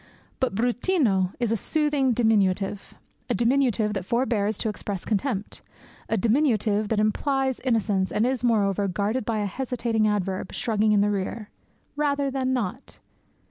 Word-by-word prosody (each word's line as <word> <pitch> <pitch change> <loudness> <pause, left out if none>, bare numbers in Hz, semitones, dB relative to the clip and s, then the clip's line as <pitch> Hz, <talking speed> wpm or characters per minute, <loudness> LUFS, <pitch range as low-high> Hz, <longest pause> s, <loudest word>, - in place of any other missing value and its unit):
But 260 -6 0
bruttino 240 - +1
is 240 -3 0
a - - +3
soothing 290 +2 +1
diminutive, 205 -4 +1 0.3
a - - +1
diminutive 235 -3 +2
that 195 -3 -3
forbears 220 -2 0
to - - -2
express 205 -3 -4
contempt, 215 -1 -2 0.5
a 225 - +1
diminutive 220 -3 +1
that 220 - +1
implies 265 +4 0
innocence, 215 -6 0
and 215 - +1
is, 255 -1 -1
moreover, 205 -4 +2
guarded 205 +6 -1
by 220 -1 -1
a - - -1
hesitating 230 0 -1
adverb, 195 -2 -2
shrugging 215 -1 +1
in 205 -1 +4
the 205 0 +2
rear 205 +2 -4 0.4
"rather 285 -1 0
than 260 -1 -1
not." 245 -1 -3
220 Hz, 145 wpm, -25 LUFS, 205-255 Hz, 0.5 s, in